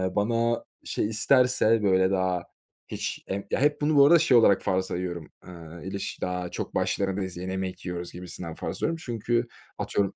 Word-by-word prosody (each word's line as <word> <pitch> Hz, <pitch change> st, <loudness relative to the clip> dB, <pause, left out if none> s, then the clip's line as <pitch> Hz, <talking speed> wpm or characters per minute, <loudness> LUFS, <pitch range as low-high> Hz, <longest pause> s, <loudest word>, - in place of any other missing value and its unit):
bana 115 Hz, +2 st, +1 dB, 0.2 s
şey -, -, -1 dB
isterse 115 Hz, -1 st, +3 dB
böyle 95 Hz, -1 st, +3 dB
daha 95 Hz, -2 st, 0 dB, 0.4 s
hiç -, -, -4 dB
em 100 Hz, +1 st, -3 dB
ya, -, -, +1 dB
hep 145 Hz, +1 st, +2 dB
bunu 150 Hz, +1 st, +2 dB
bu 140 Hz, -1 st, +8 dB
arada 170 Hz, +2 st, +7 dB
şey 140 Hz, -6 st, +5 dB
olarak 100 Hz, -4 st, +5 dB
farz 95 Hz, 0 st, +1 dB
sayıyorum. 85 Hz, -3 st, -4 dB, 0.2 s
Iıı, 85 Hz, -1 st, -10 dB
ilişki 95 Hz, +1 st, -5 dB
daha 90 Hz, -1 st, -2 dB
çok -, -, -5 dB
başlarındayız, 95 Hz, -2 st, -1 dB
yeni 90 Hz, +1 st, -4 dB
yemek 95 Hz, -1 st, -4 dB
yiyoruz 90 Hz, -1 st, -5 dB
gibisinden 90 Hz, -2 st, -7 dB
farz -, -, -5 dB
ediyorum 165 Hz, +1 st, -1 dB
çünkü 120 Hz, -1 st, -1 dB, 0.3 s
atıyorum 100 Hz, -1 st, -1 dB
95 Hz, 170 wpm, -27 LUFS, 90-115 Hz, 0.4 s, bu